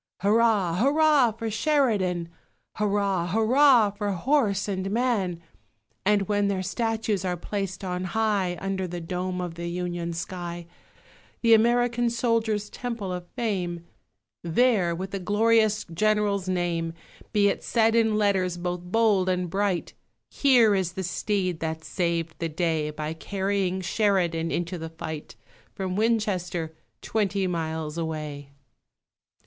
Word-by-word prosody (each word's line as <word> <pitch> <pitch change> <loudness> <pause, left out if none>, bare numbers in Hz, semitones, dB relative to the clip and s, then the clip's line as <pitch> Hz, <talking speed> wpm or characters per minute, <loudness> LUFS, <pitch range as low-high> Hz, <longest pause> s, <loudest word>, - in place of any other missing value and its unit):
Hurrah, 205 -4 +3
hurrah, 280 +1 +4
for 225 0 -4
Sheridan! 210 - +1 0.5
Hurrah, 200 -4 +1
hurrah, 225 - +5
for 205 0 -3
horse 210 - +1
and 190 -1 -2
man! 210 -6 0 0.6
And 205 0 +3
when 205 -1 +1
their 190 -2 -1
statues 225 -2 -1
are 180 -1 -1
placed 195 +1 -4
on 180 0 -3
high 195 -3 0
Under 195 -1 -2
the 175 0 -5
dome 180 +2 -3
of 175 -2 -4
the 170 +1 -5
Union 175 -1 -3
sky 175 0 -5 0.8
The 230 -1 +5
American 240 +1 +3
soldier's 230 -3 0
Temple 230 -7 -5
of 180 -1 -6
Fame 180 -7 -2 0.6
There, 180 -1 +2
with 190 +3 -5
the 195 - -3
glorious 215 +2 +2
General's 205 0 +1
name, 170 -2 -1 0.4
Be 205 -1 +3
it - - -3
said 225 -1 +2
in 225 -2 +3
letters 190 -4 +1
both 175 0 -3
bold 195 0 +2
and 180 -2 -1
bright, 195 -2 -1 0.4
"Here 245 -6 +5
is 185 -3 0
the 190 - -4
steed 185 -1 -1
that 160 0 -3
saved 170 -2 -2
the 165 - -2
day 160 -1 0
By 150 +1 -4
carrying 190 +1 -1
Sheridan 180 -4 +1
into 175 +1 -2
the 160 0 -5
fight, 155 -6 -7 0.4
From 185 -1 -3
Winchester 190 -7 0 0.3
twenty 200 -3 0
miles 160 -2 -3
away!" 150 -3 -5
190 Hz, 130 wpm, -26 LUFS, 175-215 Hz, 0.8 s, hurrah